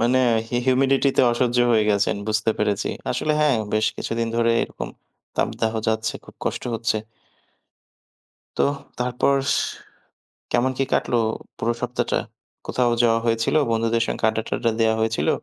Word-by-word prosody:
মানে 120 +3 +3 0.3
হি - - -5
humidity-তে 135 +1 +3
অসহ্য 120 0 +1
হয়ে 110 -2 +4
গেছেন 100 0 +1
বুঝতে 110 +1 +1
পেরেছি। 105 -2 0 0.2
আসলে 155 - 0
হ্যাঁ, 145 -5 +4 0.2
বেশ 110 0 +2
কিছুদিন 115 0 -2
ধরে 115 0 +3
এরকম - - -5 0.5
তাপদাহ 110 0 0 0.2
যাচ্ছে, 110 0 0
খুব - - -15
কষ্ট - - -2
হচ্ছে। 115 -1 0 1.6
তো - - +3 0.4
তারপর 125 +3 +1 0.2
স - - +2 1.0
কেমন 130 +2 +2
কি - - +2
কাটলো 120 - +1 0.4
পুরো 120 +1 0
সপ্তাহটা? 125 0 -1 0.5
কোথাও 125 -1 +1
যাওয়া 115 -1 +4
হয়েছিল? 115 +4 +1 0.2
বন্ধুদের 115 0 +1
সঙ্গে - - -3
আড্ডা-টডডা 110 +1 -1
দেওয়া 110 0 +3
হয়েছিল? 110 0 0
115 Hz, 135 wpm, -23 LUFS, 110-125 Hz, 1.6 s, হয়ে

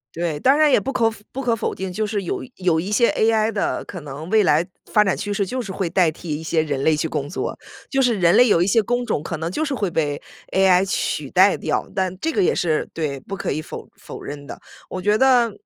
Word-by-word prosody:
对， 165 -3 -2
当 270 - +4
然 305 -2 +5
也 - - +5
不 270 +7 -4
可 230 -3 +3
否 215 -2 -12
不 270 - -4
可 240 -3 +1
否 - - -2
定， 190 -1 -5
就 215 +3 -2
是 205 -1 -2
有 175 - -4
有 175 -4 +1
一 190 +5 -4
些 235 +2 +4
ai 220 0 +2
的 205 - -2
可 180 - -8
能 150 +3 -8
未 215 -1 +4
来 155 -1 +3 0.2
发 210 - +3
展 195 - 0
趋 205 0 -3
势 200 - 0
就 255 +7 -4
是 210 -6 -5
会 185 -2 -2
代 170 -2 +3
替 155 -2 -5
一 160 - -8
些 160 0 +1
人 140 -3 -2
类 160 -1 +3
去 155 +2 -1
工 145 -2 -3
作， 160 - -4 0.3
就 270 - 0
是 250 -3 +3
人 170 -1 +4
类 250 - +7
有 170 -5 +4
一 180 - +2
些 220 +2 +3
工 245 +3 -1
种 150 - -1
可 165 - -4
能 165 +2 -3
就 310 - -2
是 285 - -2
会 205 -7 -1
被 150 -4 -1 0.3
ai 190 0 +4
取 150 -7 -2
代 190 +2 +5
掉。 - - -2
但 185 -1 -1
这 325 - -1
个 395 - +1
也 - - +3
是 160 -3 0
对， 145 -4 -3
不 195 - -6
可 - - -3
以 155 - -2
否 155 - -8
否 - - -10
认 145 0 -7
的。 - - -9 0.3
我 185 - -4
觉 210 +3 +2
得 250 -3 +4
190 Hz, 290 characters per minute, -21 LUFS, 160-220 Hz, 0.3 s, 类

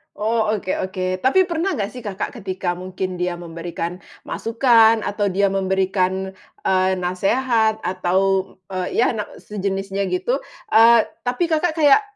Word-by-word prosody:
Oh, 220 +1 0
oke 190 -2 -3 0.2
oke. 185 0 -3
Tapi 275 - +4
pernah 340 +3 -1
nggak 200 -2 -2
sih 250 - -9
Kakak 200 -1 -3
ketika 185 -3 -3
mungkin 185 0 -5
dia 180 0 -1
memberikan 170 +1 -6 0.2
masukan, 225 -2 +3
atau 205 0 -1
dia 195 +1 +1
memberikan, 190 0 0 0.3
eee, 185 0 +2
nasehat 220 +5 +1
atau, 190 +1 0 0.2
eee, 185 -1 -2 0.2
ya, - - +3
nak 210 -2 -4
sejenisnya 195 -1 -3
gitu, 185 +8 0 0.4
eee, 230 0 +7 0.2
tapi 250 +6 -1
Kakak 315 +1 +1
kayak, 295 +4 +6
195 Hz, 140 wpm, -21 LUFS, 185-225 Hz, 0.4 s, eee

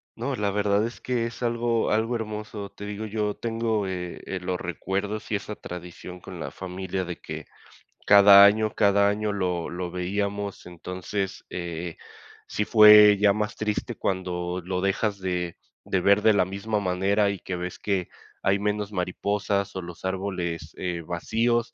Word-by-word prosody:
No, 130 +4 -3
la 105 -3 0
verdad 100 +1 +2
es 120 - -7
que 125 -2 -1
es 115 - -7
algo 120 -1 0
algo 110 +3 +1
hermoso. 105 -2 -5
Te 100 - -10
digo, 105 +1 -5
yo 105 -1 -1
tengo, 115 -3 -1
eh, 90 -2 -5
eh, 95 - -3
los 90 0 -3
recuerdos 105 +3 -3
y - - +2
esa 105 +1 -4
tradición 90 +1 -9
con - - -10
la - - -5
familia 95 0 -4
de 85 -1 -6
que - - -7 0.6
cada 100 -1 +9
año 105 +1 +4
cada 100 0 +4
año 105 +1 0
lo 90 -4 -2
lo 90 0 -4
veíamos. 100 +2 -3
Entonces, 90 +2 -5
eh, 85 -1 -5 0.5
sí 105 - -1
fue 105 -2 +8
ya 100 -1 +5
más 105 0 -2
triste 105 -1 -2
cuando 90 -1 -2
lo 90 0 -2
dejas 100 +1 0
de 90 -2 -3 0.3
de 95 - 0
ver 100 +2 +4
de 110 - +6
la 100 -3 +3
misma 100 +3 -2
manera 100 +2 +1
y 100 - -2
que 90 - -5
ves 90 +1 -5
que 95 -4 -1 0.3
hay 95 +1 +2
menos 105 0 -2
mariposas 100 +1 -1
o 95 - -3
los 85 +1 -9
árboles, 90 -4 -3
eh, 90 -2 -3
vacíos, 115 +7 0
100 Hz, 170 wpm, -26 LUFS, 90-105 Hz, 0.6 s, cada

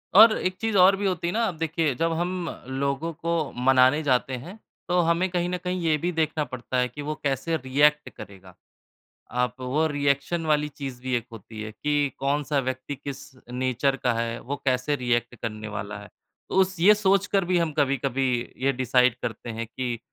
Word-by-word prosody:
और 220 +1 +9
एक 185 0 -1
चीज़ 225 -3 +1
और 185 +2 +7
भी 200 +1 -3
होती 175 -3 -1
है 175 - -1
ना, 230 +1 +1
अब 175 -6 -4
देखिए 160 -2 0
जब 165 +5 0
हम 175 +2 -1 0.4
लोगों 140 +4 -2
को 170 +2 -4 0.4
मनाने 130 +3 +5
जाते 130 -1 +1
हैं, 180 - -10 0.3
तो 180 0 +2
हमें 170 +3 +1
कहीं 175 -1 -1
न 180 - -1
कहीं 180 +1 -3
ये 160 -2 +2
भी 175 +4 -1
देखना 160 -2 0
पड़ता 130 0 -4
है 125 0 +2
कि 145 - -8
वो 150 +1 -3
कैसे 145 +4 0
रिएक्ट 145 +3 +2
करेगा। 95 -3 -12 0.8
आप 125 0 0
वो 140 +5 +1
रिएक्शन 145 +3 0
वाली 150 -1 +2
चीज़ 135 -4 -7
भी 130 0 -3
एक 115 - -2
होती 110 0 -9
है 110 0 -5
कि 145 +4 0
कौन-सा 140 +1 0
व्यक्ति 130 +2 -4
किस 140 0 -8 0.2
नेचर 130 +2 0
का 125 -2 +3
है, 115 0 -2
वो 140 +3 -4
कैसे 130 +3 +1
रिएक्ट 120 -1 -1
करने 110 -1 -5
वाला 105 -1 -5
है। 105 - -12 0.4
तो - - -3
उस 190 0 0
ये 205 +5 +7
सोच 200 -1 +2
कर 195 -3 +1
भी 180 0 +2
हम 165 -2 +1
कभी-कभी 135 -1 +1 0.4
ये 140 - +4
डिसाइड 125 -1 +3
करते 120 - -5
हैं 115 +1 -4
कि 120 0 -4
140 Hz, 200 wpm, -25 LUFS, 125-170 Hz, 0.8 s, और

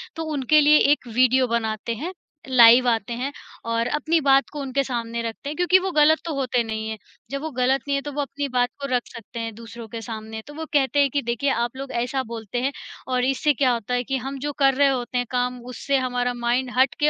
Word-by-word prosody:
तो 325 - -4
उनके 295 +2 +4
लिए 300 +1 +6
एक 290 -4 0
वीडियो 255 +2 +4
बनाते 230 -1 -2
हैं, 330 - -5 0.4
लाइव 245 0 +7
आते 230 -1 0
हैं 270 +3 -2 0.3
और 230 0 0
अपनी 315 +5 +1
बात 275 -1 +4
को 295 - -5
उनके 275 0 -1
सामने 235 -3 -3
रखते 230 +4 -5
हैं, 300 - -5
क्योंकि 355 +1 +5
वो 380 0 -3
गलत 305 0 +5
तो 330 - -3
होते 255 -3 0
नहीं 220 -1 -4
हैं, 220 - -4 0.3
जब 275 0 -3
वो 315 - -3
गलत 260 +1 +1
नहीं 280 - +1
है, 275 - 0
तो 290 - -6
वो 290 - -1
अपनी 285 0 -3
बात 245 -1 +1
को 280 - -2
रख 250 -1 +2
सकते 230 +1 -9
हैं 225 -1 -4
दूसरों 230 0 -10
के 225 +1 -7
सामने। 220 0 -7
तो 295 - -10
वो 320 +2 -6
कहते 285 0 +2
हैं 280 -1 +4
कि 285 - +1
देखिए 235 +3 -1
आप 235 0 -1
लोग 270 0 -6
ऐसा 265 +2 -1
बोलते 230 -1 -5
हैं 270 +2 0 0.4
और 250 0 +2
इससे 270 +3 +2
क्या 260 -1 +2
होता 235 +1 -3
है, 245 0 +1
कि 270 +2 -2
हम 270 +2 -5
जो 290 +2 -3
कर 270 -1 +5
रहे 280 +2 +4
होते 250 -2 -2
हैं 245 - 0
काम 250 0 -1
उससे 275 +2 -1
हमारा 245 -1 -1
माइंड 245 +2 -1
हटके 270 +3 +3
255 Hz, 240 wpm, -23 LUFS, 235-280 Hz, 0.4 s, लाइव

